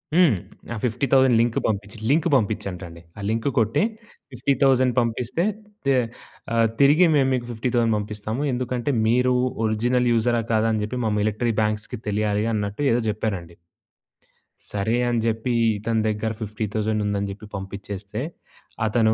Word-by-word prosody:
హ్మ్. 170 - +5 0.4
ఆ - - -4
50,000 130 +1 +3
లింక్ 115 0 +1
పంపించి 105 0 -2
లింక్ 160 +5 +3
పంపించటండి. 100 -7 -2 0.2
"ఆ - - -7
లింక్ 115 +3 -1
కొట్టే, 115 - +3 0.5
50,000 130 -1 +2
పంపిస్తే 120 +6 -1 0.4
తే 135 - +4 0.6
ఆహ్, 115 0 +4
తిరిగి 145 +6 +6
మేము 135 -2 +3
మీకు 125 -2 -1
50,000 115 -1 +1
పంపిస్తాము. 105 +4 -4
ఎందుకంటే, 125 +2 -1 0.2
మీరు 125 +2 +3 0.3
ఒరిజినల్ 120 +3 +1
యూజరా 120 +1 +2
కాదా, 110 +1 +3
అని 110 - 0
చెప్పి 125 +4 -4
మా 110 - +1
మిలటరీ 110 +3 0
బ్యాంక్స్‌కి 105 +2 -2
తెలియాలి" 105 0 0
అన్నట్టు 105 +3 -2
ఏదో 120 - +2
చెప్పారండి. 100 -6 -3 1.2
సరే, 105 +3 0
అని 120 -1 +1
చెప్పి 115 +2 0 0.3
ఇతని 110 +2 0
దగ్గర 110 +1 -1
50,000 110 0 -2
ఉందని 100 -1 -1
చెప్పి 105 +2 -9
పంపించేస్తే, 100 +2 -6 0.6
అతను 110 0 +3
110 Hz, 135 wpm, -23 LUFS, 105-125 Hz, 1.2 s, తిరిగి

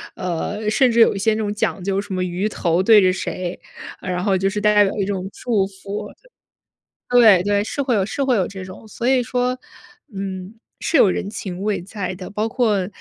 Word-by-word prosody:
呃， 185 +4 -3
甚 250 +3 +3
至 235 - +1
有 225 - +6
一 - - -3
些 220 +2 +2
那 - - -2
种 205 -1 -1
讲 205 -2 -2
究 195 +1 0
什 200 -1 -5
么 185 0 -1
鱼 180 +3 -1
头 175 -4 0
对 215 0 +7
着 185 -1 +4
谁， 185 -1 -4 0.4
呃 185 - -6
然 180 0 -2
后 195 -2 +2
就 190 +1 +1
是 210 +1 -3
大 210 +1 +4
家 205 0 +6
有 195 - -1
一 195 - +1
种 190 -2 -3
祝 215 -6 0
福。 195 +1 -7 1.0
对 225 -7 +6
对， 205 +1 +1
是 280 - -3
会 260 -3 +1
有 195 -3 +1
是 275 +7 -2
会 260 -2 +2
有 190 -5 +1
这 195 -1 -8
种。 185 +4 -11
所 235 +3 -4
以 260 -1 +3
说， 250 +1 -1 0.6
嗯， 190 0 -5 0.3
是 - - -2
有 235 -9 +6
人 185 - -2
情 195 -4 -6
味 210 -3 -1
在 195 +1 -5
的， 185 0 -8
包 210 +2 -2
括 220 -6 +1
200 Hz, 240 characters per minute, -21 LUFS, 185-220 Hz, 1.0 s, 对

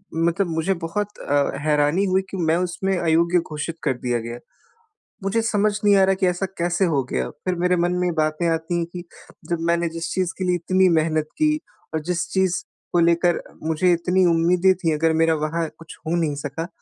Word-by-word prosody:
मतलब 170 +3 +1
मुझे 165 +3 0
बहुत 205 +4 -3
अ, 145 0 +1
हैरानी 150 +5 +2
हुई 190 0 +2
कि 195 - -4
मैं 165 -1 +2
उसमें 180 +1 -1
अयोग्य 170 +1 +3
घोषित 160 +1 -5
कर - - +2
दिया 120 -1 -1
गया। 115 +1 -6 0.8
मुझे 215 +4 +1
समझ 210 -2 +2
नहीं 205 -1 +5
आ 190 - +5
रहा 190 0 +2
कि 190 - 0
ऐसा 180 +2 0
कैसे 175 +2 +1
हो 145 -6 +1
गया 65 0 -1 0.2
फिर 180 -1 0
मेरे 180 0 +3
मन 175 +1 +1
में 180 -1 +1
बातें 155 +2 0
आती 165 +2 -1
हैं 170 - 0
कि 175 -1 -6 0.5
जब 170 -1 0
मैंने 170 0 +2
जिस 165 +2 -5
चीज़ 185 -2 -1
के - - -1
लिए 180 0 +2
इतनी 185 +2 +2
मेहनत 155 -1 +1
की 310 0 +4 0.4
और 160 - -1
जिस 175 -1 0
चीज़ 190 -2 +2 0.4
को 175 - +4
लेकर 170 +1 +3 0.2
मुझे 160 +3 +2
इतनी 180 +2 +2
उम्मीदें 175 +3 +4
थीं, 165 -3 0
अगर 160 +1 +2
मेरा 160 0 +3
वहाँ 160 +2 -1
कुछ 165 - -12
हो 170 - +1
नहीं 155 -4 0
सका 165 +4 -4
170 Hz, 205 wpm, -22 LUFS, 160-185 Hz, 0.8 s, नहीं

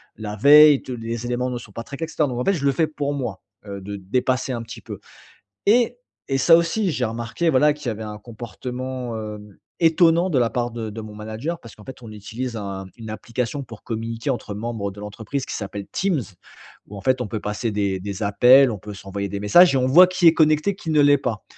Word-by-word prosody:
la 105 -1 -6
veille, 145 +5 +7
tous 130 - -6
les 115 0 -5
éléments 125 +1 -1
ne 125 - -3
sont 105 - -13
pas 115 - -7
traités 140 +5 -5
et - - -12
cetera. 155 -2 0
Donc 125 -2 -4
en 125 - 0
fait, 195 - +3
je 140 -5 -3
le 140 - +4
fais 160 +4 +1
pour 145 -2 -3
moi, 120 -9 -4 0.3
heu, 100 -1 -6
de 100 +2 -6
dépasser 125 +7 -1
un 120 -2 -3
petit 115 - -10
peu. - - -8 0.7
Et 240 +3 +3 0.3
et 135 - +1
ça 165 +6 +6
aussi, 175 +3 0
j'ai 130 -3 -1
remarqué, 115 +9 -2
voilà, 150 +1 +4
qu'il 150 -1 -11
y - - +2
avait 110 0 -5
un 105 0 -7
comportement, 125 +2 -6
hem, 105 -2 -8 0.3
étonnant 165 +2 +4
de 140 - +2
la 120 -2 +2
part 120 -1 -2
de 115 -2 -5
de 110 - -7
mon 110 -1 -9
manager 110 +11 -5
parce 115 - -13
qu'en 105 - -16
fait, 130 -1 -11
on 110 - -10
utilise 110 +4 -6
un 100 -2 -5
une 115 -2 -9
application 115 +5 -4
pour 115 -3 -12
communiquer 115 +3 -4
entre 110 -5 -4
membres 110 -2 -4
de 100 - -12
l'entreprise 110 +6 -5
qui - - -5
s'appelle 100 -1 -5
Teams, 185 -7 0 0.7
où 105 - -10
en - - -7
fait, 130 +3 +1
on 120 - -4
peut 110 0 -4
passer 105 +2 -3
des 100 -2 -1
des 100 +2 -6
appels. 125 +6 +6
On 105 - -4
peut 105 +2 -9
s'envoyer 100 0 -5
des 100 - -4
messages 175 - +6
et - - +3
on 130 - +1
voit 170 +8 +8
qui 185 -1 +1
est 165 - +5
connecté, 155 +5 +3
qui 160 - -6
ne 150 - +4
l'est 145 0 +5
pas. 115 -6 -4
120 Hz, 240 wpm, -22 LUFS, 105-145 Hz, 0.7 s, voit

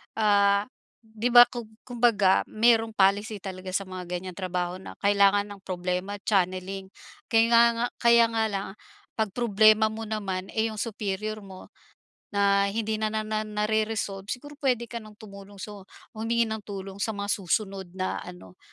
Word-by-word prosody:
ah, 200 -1 +3 0.3
'di 225 +2 -3
ba, 240 0 +11
kung 240 -3 -7 0.2
kumbaga 230 -6 +3
merong 225 0 +2
policy 205 +1 +2
talaga 185 -1 -7
sa 195 - +1
mga 185 -1 -6
ganyang 180 +1 -5
trabaho 180 -1 -2
na 190 - -10
kailangan 200 0 +3
ang 195 - -23
problema, 180 +2 -3
channeling. 190 -1 -1 0.4
Kayla 230 +1 +5 0.2
nga - - +2
kaya 235 -1 +5
nga 225 -1 0
lang, 195 -1 -3 0.5
'pag 215 -3 -1
problema 215 -1 +4
mo 220 +1 -6
naman, 195 -3 -3
eh, 225 0 +1
yung 215 - -8
superior 215 -1 -3
mo 190 -1 -12 0.7
na 200 0 +3
hindi 220 +1 -2
na 215 - 0
na 215 0 -2
na 215 0 -3
nare-resolve, 210 -2 -1
siguro 290 +5 -6
puwede 255 -5 +1
ka 235 - -4
nang 215 -1 -13
tumulong, 200 -1 -12
so, 205 -2 -9 0.3
humingi 230 +2 0
ng 220 -1 -4
tulong 195 -1 -7
sa 220 +2 -2
mga 200 0 -4
susunod 195 0 -2
na 185 0 -2
ano, 175 - -12
205 Hz, 160 wpm, -26 LUFS, 195-220 Hz, 0.7 s, ba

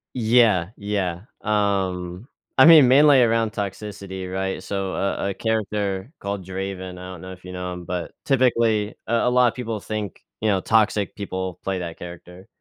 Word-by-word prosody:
Yeah. 110 -7 +3
Yeah. 100 -3 -2 0.2
Um, 95 -2 -1 0.3
I 130 - +8
mean, 160 -5 +9
mainly 140 +1 +6
around 115 -2 +2
toxicity, 100 -2 -5
right? 95 0 -3
So, 95 -1 -3
a 100 0 -1
a - - -2
character 105 -1 -2
called 100 -2 -4
Draven, 95 0 -5
I 90 0 -8
don't 90 -3 -10
know 95 0 -8
if 90 - -15
you 90 - -8
know 90 0 -4
him, 90 -1 -8
but 90 0 -4
typically, 115 -5 +2
a 115 - 0
a - - +4
lot 125 0 +4
of 120 - 0
people 115 -4 -4
think, 105 -2 -5 0.2
you 110 - +1
know, 100 -2 +2
toxic 105 -2 +2
people 95 -3 -5
play 95 -1 -2
that 85 -2 -6
character. 90 +1 -10
100 Hz, 175 wpm, -23 LUFS, 95-110 Hz, 0.3 s, mean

